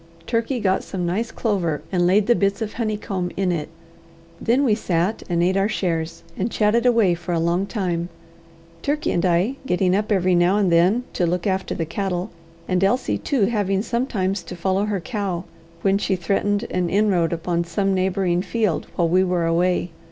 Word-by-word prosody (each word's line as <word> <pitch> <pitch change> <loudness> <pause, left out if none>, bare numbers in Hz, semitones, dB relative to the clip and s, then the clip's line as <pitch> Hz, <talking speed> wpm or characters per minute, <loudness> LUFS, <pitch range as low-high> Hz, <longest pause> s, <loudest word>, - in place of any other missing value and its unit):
Turkey 235 +2 -1
got 190 -3 +1
some 180 -3 -4
nice 210 +7 -1
clover, 170 - -1
and 175 -2 +2
laid 195 +3 +4
the 240 - +5
bits 200 -2 +1
of 220 -2 -4
honeycomb 210 -5 -2
in 190 -2 +1
it. 155 -3 -3 0.7
Then 245 +5 +2
we 240 -6 +3
sat 185 -1 0
and 170 -1 +1
ate 185 +2 +2
our 195 +2 +2
shares, 165 -6 -2
and 200 +5 -1
chatted 230 +3 +2
away 225 -7 +4
for 175 +1 -4
a 165 - +1
long 170 +4 +1
time, 175 -6 -2 0.7
Turkey 295 - -1
and 170 - 0
I 185 +9 +2
getting 180 0 +2
up 210 +2 -1
every 185 -2 +3
now 175 +3 +3
and 195 -4 +2
then 180 +9 +4
to 175 - +1
look 175 0 -1
after 190 -1 -1
the 165 - -2
cattle, 185 +3 -3 0.4
and 185 0 +1
Elsie 245 +7 +1
too 260 -9 +1
having 195 -3 0
sometimes 215 -6 -1
to 170 +1 -8
follow 190 +3 0
her 205 -2 -1
cow, 195 -5 -3 0.4
when 195 0 +3
she 195 - 0
threatened 200 +3 0
an 180 -1 0
inroad 190 -4 +2
upon 170 0 -1
some 195 +3 0
neighbouring 185 -1 +1
field 215 -4 -1
while 170 - +2
we 185 +3 +3
were 180 -2 0
away. 175 +1 +1
190 Hz, 190 wpm, -22 LUFS, 175-210 Hz, 0.7 s, the